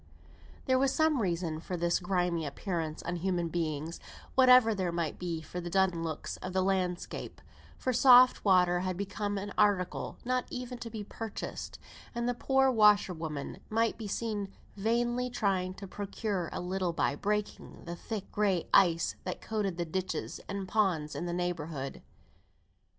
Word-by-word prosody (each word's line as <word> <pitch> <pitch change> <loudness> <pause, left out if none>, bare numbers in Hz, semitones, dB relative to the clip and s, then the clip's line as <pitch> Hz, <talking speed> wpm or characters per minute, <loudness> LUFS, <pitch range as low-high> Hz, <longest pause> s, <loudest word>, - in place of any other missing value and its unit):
There 260 -1 +3
was 270 0 +3
some 315 -3 +2
reason 170 -4 -1
for 180 +2 -4
this 175 0 +1
grimy 180 -2 0
appearance 160 +1 -3
on 175 +1 -2
human 175 -1 -1
beings, 160 -1 -3 0.3
whatever 255 -3 +7
there 185 -4 -1
might 170 -2 -2
be 170 -3 -3
for 180 +3 -6
the 175 - -5
dun 185 -2 +2
looks 160 -2 -4
of 185 - -6
the 190 0 +2
landscape; 185 -2 -2 0.4
for 255 - -1
soft 250 0 +7
water 180 -3 +4
had 185 -1 -2
become 205 +1 -2
an 200 +1 -5
article 200 -4 +1
not 255 0 0
even 250 -1 -5
to 230 - -6
be 220 -2 -5
purchased; 220 +1 -6 0.4
and 235 0 -1
the 245 - +1
poor 265 +2 +3
washerwomen 180 - +2
might 225 +1 +1
be 220 - -5
seen 205 -2 -3 0.2
vainly 240 +4 0
trying 190 -6 0
to 195 - -8
procure 200 -2 -3
a - - -4
little 180 -1 -1
by 150 - +1
breaking 210 +5 -3
the 170 0 -5
thick 210 +2 -6
gray 195 -5 +1
ice 170 -3 +4
that 180 - -4
coated 205 -5 -2
the 175 - -1
ditches 185 +3 -3
and 200 -1 -3
ponds 185 -8 +1
in 175 - -3
the - - -2
neighbourhood. 165 -6 -3
190 Hz, 160 wpm, -31 LUFS, 175-220 Hz, 0.4 s, whatever